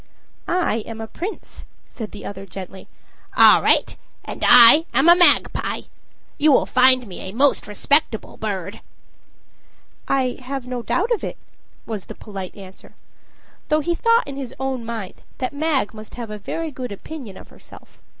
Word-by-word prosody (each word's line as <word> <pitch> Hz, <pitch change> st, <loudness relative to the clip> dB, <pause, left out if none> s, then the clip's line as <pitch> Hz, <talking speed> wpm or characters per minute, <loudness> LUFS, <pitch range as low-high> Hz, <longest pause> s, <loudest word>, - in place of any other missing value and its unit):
"I 350 Hz, -10 st, 0 dB
am 225 Hz, -1 st, -8 dB
a 225 Hz, -, -5 dB
prince," 370 Hz, -, -8 dB, 0.2 s
said 220 Hz, -3 st, -8 dB
the 210 Hz, -, -11 dB
other 195 Hz, 0 st, -8 dB
gently. 190 Hz, 0 st, -10 dB, 0.5 s
"All -, -, +7 dB
right. -, -, +2 dB, 0.3 s
And -, -, -7 dB
I 250 Hz, +7 st, +8 dB
am 275 Hz, -, +4 dB
a 345 Hz, -, +9 dB
magpie. 355 Hz, 0 st, +3 dB, 0.6 s
You 305 Hz, +1 st, +4 dB
will 265 Hz, -, +4 dB
find 255 Hz, 0 st, +4 dB
me 190 Hz, -4 st, -9 dB
a 190 Hz, -, -7 dB
most 275 Hz, +5 st, +2 dB
respectable 225 Hz, +3 st, -1 dB
bird." 200 Hz, -5 st, -5 dB, 1.3 s
"I 260 Hz, -2 st, 0 dB
have 265 Hz, 0 st, -6 dB
no 250 Hz, -1 st, -4 dB
doubt 405 Hz, -, -1 dB
of 465 Hz, -, 0 dB
it," -, -, -5 dB, 0.5 s
was 215 Hz, -4 st, -6 dB
the -, -, -9 dB
polite 195 Hz, -3 st, -8 dB
answer 190 Hz, -2 st, -14 dB, 0.7 s
though 305 Hz, 0 st, +2 dB
he 345 Hz, +3 st, -1 dB
thought 460 Hz, +1 st, +2 dB
in 275 Hz, -1 st, -7 dB
his 265 Hz, -2 st, -7 dB
own 265 Hz, -2 st, -3 dB
mind 225 Hz, -4 st, -7 dB, 0.2 s
that 255 Hz, +1 st, -3 dB
Mag 285 Hz, -7 st, -1 dB
must 215 Hz, -1 st, -11 dB
have 235 Hz, -3 st, -7 dB
a 210 Hz, -, -7 dB
very 325 Hz, +10 st, -5 dB
good 255 Hz, -3 st, -7 dB
opinion 225 Hz, -1 st, -9 dB
of -, -, -14 dB
herself. -, -, -17 dB
250 Hz, 165 wpm, -21 LUFS, 210-290 Hz, 1.3 s, a